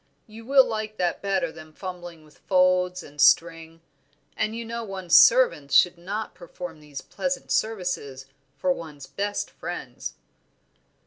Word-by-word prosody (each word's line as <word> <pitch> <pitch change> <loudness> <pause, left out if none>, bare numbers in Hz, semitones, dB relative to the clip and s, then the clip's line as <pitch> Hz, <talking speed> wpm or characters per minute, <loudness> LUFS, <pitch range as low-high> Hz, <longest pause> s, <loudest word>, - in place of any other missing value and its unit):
You 225 +1 -13
will 270 -1 +6
like 215 -1 -4
that 175 -2 -1
better 190 -4 0
than 155 -1 -13
fumbling 175 -3 -8
with 150 -3 -22
folds 180 -1 +2
and 145 0 -7
string; 165 +3 +3 0.5
and 220 - -1
you 230 0 -5
know 230 +1 -5
one's 190 -4 -1
servants 480 - +5
should 180 +3 +6
not 205 +5 -5
perform 175 -2 -9
these 150 -2 -9
pleasant 270 -1 -4
services 180 -11 -2 0.3
for 180 +6 +1
one's 150 -5 -10
best 205 +5 -3
friends." - - -7
180 Hz, 140 wpm, -25 LUFS, 160-215 Hz, 0.5 s, will